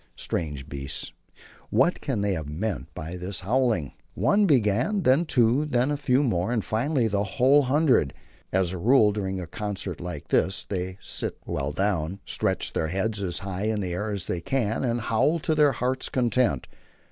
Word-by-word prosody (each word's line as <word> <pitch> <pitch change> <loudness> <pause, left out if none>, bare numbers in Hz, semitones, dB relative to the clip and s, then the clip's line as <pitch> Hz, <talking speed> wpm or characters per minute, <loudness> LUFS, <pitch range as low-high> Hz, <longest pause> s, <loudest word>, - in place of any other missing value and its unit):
Strange 75 -5 -4
beasts! 70 +1 -4 0.6
what 135 +11 +2
can 130 -8 -1
they 100 -1 +1
have 80 -4 -4
meant 85 - -3
by 80 +3 -6
this 90 +2 -4
howling? 110 - +1 0.2
One 205 0 +3
began, 130 - +2
then 140 +5 +4
two, 125 0 +3
then 130 -1 +1
a - - +1
few 140 -1 +2
more, 95 -5 0
and, 115 -4 0
finally, 125 +2 +1
the 100 -1 0
whole 135 +4 +6
hundred. 135 - +3 0.4
As 95 -2 +1
a 95 - -5
rule, 110 +1 +5
during 95 -2 -3
a 90 - -4
concert 100 -2 -4
like 85 -5 -6
this 95 - +1
they 95 -1 -4
sit - - -3
well 70 +1 -2
down, 95 0 -1
stretch - - -1
their 80 - 0
heads 100 +4 -2
as 90 -3 -2
high 95 +1 -3
in 110 -1 0
the 90 -3 -3
air 105 +5 -2
as 100 -5 -3
they 85 - -3
can, 115 +2 -1
and 120 -2 0
howl 130 +9 +2
to 160 0 -1
their 150 -2 +4
hearts' 130 +2 -1
content. 120 - +1
105 Hz, 180 wpm, -26 LUFS, 90-130 Hz, 0.6 s, whole